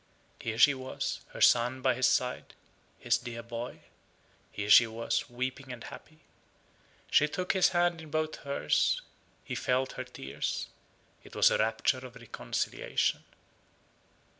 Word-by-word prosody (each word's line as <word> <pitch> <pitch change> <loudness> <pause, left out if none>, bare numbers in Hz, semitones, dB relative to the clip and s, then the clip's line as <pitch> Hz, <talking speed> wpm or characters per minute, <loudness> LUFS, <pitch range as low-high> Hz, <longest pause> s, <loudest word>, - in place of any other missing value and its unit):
Here 110 -1 -4
she 145 - +7
was, 130 -1 -4
her - - -10
son 125 +2 +4
by 130 - +4
his 130 +1 +2
side, 125 0 -1 0.4
his - - +1
dear 115 -1 -7
boy. 115 +1 -6 0.7
Here 105 0 -2
she 115 - +9
was, 115 +1 -2
weeping 130 +2 -4
and 120 -2 -8
happy. 155 0 -12 0.9
She 150 - +5
took 180 +4 -1
his 190 -1 +4
hand 175 -2 +1
in 160 - -11
both 155 0 -1
hers; 140 - 0 0.4
he - - -6
felt 130 +1 0
her 130 - -5
tears. 70 - -4 0.6
It - - -14
was - - +5
a - - +1
rapture 110 +3 +1
of 125 -1 -10
reconciliation. 120 -2 -2
130 Hz, 140 wpm, -30 LUFS, 115-145 Hz, 0.9 s, she